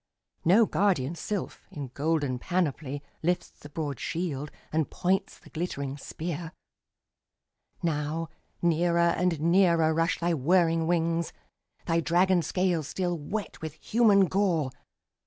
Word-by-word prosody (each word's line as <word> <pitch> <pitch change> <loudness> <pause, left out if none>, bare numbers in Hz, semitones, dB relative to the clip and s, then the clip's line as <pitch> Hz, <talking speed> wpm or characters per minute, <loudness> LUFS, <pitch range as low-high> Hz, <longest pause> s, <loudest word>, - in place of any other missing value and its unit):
No 205 +7 +6
guardian 180 -10 +1
sylph, 190 +4 -5
in 140 -3 -6
golden 145 -4 0
panoply, 145 -4 -1 0.2
Lifts 175 +2 0
the 145 - -14
broad 145 -3 -4
shield, 155 -4 -3 0.2
and 155 -2 +1
points 190 +2 0
the - - -18
glittering 140 -5 -3
spear. 165 +3 -5 1.3
Now 160 0 -1 0.4
near 170 0 +2
and 170 -1 +2
nearer 170 -1 +4
rush 165 +2 +1
thy 170 0 +1
whirring 165 +2 +3
wings, 170 -1 0 0.5
Thy 165 0 +2
dragon 175 +2 +3
scales 175 -2 0
still 180 0 -1
wet 185 +8 -5
with 160 -2 -5
human 205 +2 +4
gore. 180 -8 +1
165 Hz, 120 wpm, -28 LUFS, 155-180 Hz, 1.3 s, No